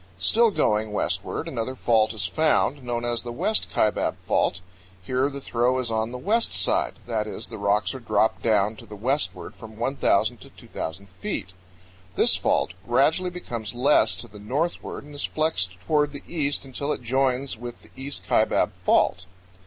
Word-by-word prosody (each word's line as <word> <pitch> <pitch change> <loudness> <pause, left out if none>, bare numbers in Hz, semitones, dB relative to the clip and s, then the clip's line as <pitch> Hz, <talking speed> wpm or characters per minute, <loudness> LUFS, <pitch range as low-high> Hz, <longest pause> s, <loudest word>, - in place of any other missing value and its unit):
Still 225 - +5
going 110 - +1
westward, - - -2
another 125 +3 -3
fault 110 -3 +3
is 100 -5 -1
found, 150 - +2
known 120 -1 -2
as 120 -1 +1
the 120 - -6
West 215 - 0
Kaibab 105 - +1
Fault. 90 - +1 0.4
Here 130 +9 0
the 140 0 -6
throw 125 -1 +1
is 125 -3 -1
on 110 +1 0
the 125 - -5
west 220 - +1
side, - - +2
that 110 -3 -1
is, - - -5
the - - -7
rocks 100 +3 +1
are 130 - -6
dropped 110 -1 +1
down 105 -1 +2
to - - -12
the 105 - -9
westward 130 +8 -2
from 110 -1 -12
1,000 120 -2 +1
to - - -12
2,000 95 +5 -7
feet. 90 0 -4 0.7
This - - +5
fault - - +1
gradually 155 +9 +3
becomes 120 -11 -5
less 135 +5 +4
to 120 - -5
the 105 -1 -13
northward 145 +14 -2
and 145 +1 -13
is 145 - -2
flexed 95 - -1
toward 150 +7 +1
the 140 - -7
east 145 -4 -1
until 140 +2 -3
it 125 - -3
joins 130 +2 +1
with 120 +1 -9
the - - -19
East 140 +2 -5
Kaibab - - +3
Fault. - - +2
120 Hz, 175 wpm, -25 LUFS, 110-140 Hz, 0.7 s, Still